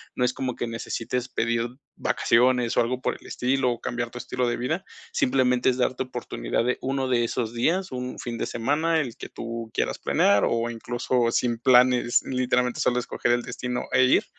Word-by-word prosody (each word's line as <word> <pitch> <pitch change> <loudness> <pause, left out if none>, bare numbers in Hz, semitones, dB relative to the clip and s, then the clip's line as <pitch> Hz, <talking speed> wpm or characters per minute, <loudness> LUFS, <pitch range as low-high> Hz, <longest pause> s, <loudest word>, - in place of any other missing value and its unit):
No 125 - 0
es 125 - 0
como 130 -2 -3
que 120 - -3
necesites 120 +2 -3
pedir 115 0 0 0.3
vacaciones, 125 0 +2
o - - +6
algo 125 +2 -1
por - - -1
el - - -19
estilo, 125 -2 0
cambiar 120 -1 -3
tu 125 - -8
estilo 125 0 -2
de 120 - 0
vida. 160 +10 -2 0.3
Simplemente, 125 -1 +2
es 125 - 0
darte 130 0 0
oportunidad 125 -2 -3
de 125 - +1
uno 135 0 -1
de 120 -2 +2
esos 115 -1 -2
días, 180 +9 +1
un 125 0 -5
fin 120 -1 -4
de - - -2
semana, 150 +7 +1
el 125 -3 -6
que - - -8
tú 115 -1 -6
quieras - - -1
planear 100 0 +3
o 115 0 0
incluso 120 +1 -1
sin 120 -1 +1
planes, 125 0 +4
literalmente, 125 -1 0
solo 125 0 +2
escoger 120 - -1
el 120 0 +2
destino 125 0 -4
e 130 - +5
ir, 130 - +4
125 Hz, 190 wpm, -25 LUFS, 120-130 Hz, 0.3 s, o